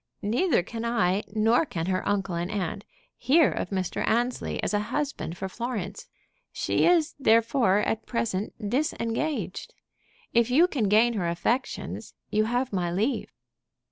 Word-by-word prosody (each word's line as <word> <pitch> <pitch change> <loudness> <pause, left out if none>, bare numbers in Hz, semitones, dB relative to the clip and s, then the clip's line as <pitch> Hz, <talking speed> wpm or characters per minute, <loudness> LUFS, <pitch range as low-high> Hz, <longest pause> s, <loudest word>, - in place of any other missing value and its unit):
Neither 235 - +2
can 225 +4 -6
I, 205 -5 +1
nor 220 +6 +3
can 170 - -4
her 185 0 0
uncle 195 -3 0
and 170 +1 -2
aunt, 200 0 -3 0.3
hear 300 +3 +4
of - - -3
Mr. 185 -3 -2
Annesley 240 +2 0
as - - -1
a 205 - +3
husband 280 - -3
for 190 - -3
Florence. 205 -2 -5 0.4
She - - +1
is 340 -3 +3
therefore 230 -4 +3
at 220 +1 -2
present 215 -2 -2
disengaged. 280 +1 -2 0.6
If 235 0 +3
you 310 +8 +5
can 265 -11 -1
gain 225 +3 +4
her 190 -6 -1
affections, 235 +10 -2 0.2
you 215 +1 +2
have 245 +1 -1
my 175 -2 0
leave." 215 +10 -1
225 Hz, 145 wpm, -27 LUFS, 195-250 Hz, 0.6 s, you